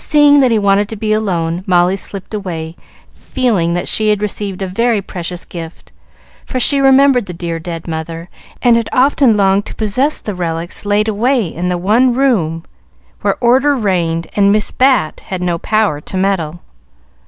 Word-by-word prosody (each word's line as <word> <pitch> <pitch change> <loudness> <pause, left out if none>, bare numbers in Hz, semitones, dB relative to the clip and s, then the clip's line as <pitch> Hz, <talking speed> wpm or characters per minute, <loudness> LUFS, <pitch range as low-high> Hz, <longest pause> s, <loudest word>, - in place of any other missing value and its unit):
Seeing 295 -1 +5
that 260 -2 +4
he 225 - +2
wanted 200 0 +2
to 220 - -5
be 215 0 -1
alone, 175 -5 -1
Molly 180 0 +3
slipped 195 +1 -7
away, 170 -6 -5 0.4
feeling 210 -10 -1
that 175 0 -2
she 215 -1 +1
had 210 -1 +2
received 200 -2 -4
a - - -3
very 230 +4 0
precious 180 -2 -6
gift; 165 -1 -10 0.5
for 255 - -4
she 280 +2 +3
remembered 270 -4 +4
the 180 - -7
dear, 170 -1 -4
dead 165 0 -7
mother, 165 +1 -5 0.4
and 240 -2 +5
had 230 - -2
often 260 -3 +3
longed 195 +1 +2
to - - -8
possess 250 +8 0
the 210 - -5
relics 170 +2 -4
laid 210 +1 +1
away 230 +3 +1
in 170 +2 -4
the 180 0 0
one 230 +7 +2
room 185 - 0 0.6
where - - 0
order 265 +4 +3
reigned 175 -7 -1
and 200 -1 +4
Miss 210 +1 +1
Bat 255 - +2
had 185 -2 -4
no 175 -2 -1
power 210 -9 0
to 185 - -6
meddle. 175 -4 -1
200 Hz, 175 wpm, -15 LUFS, 175-235 Hz, 0.6 s, Seeing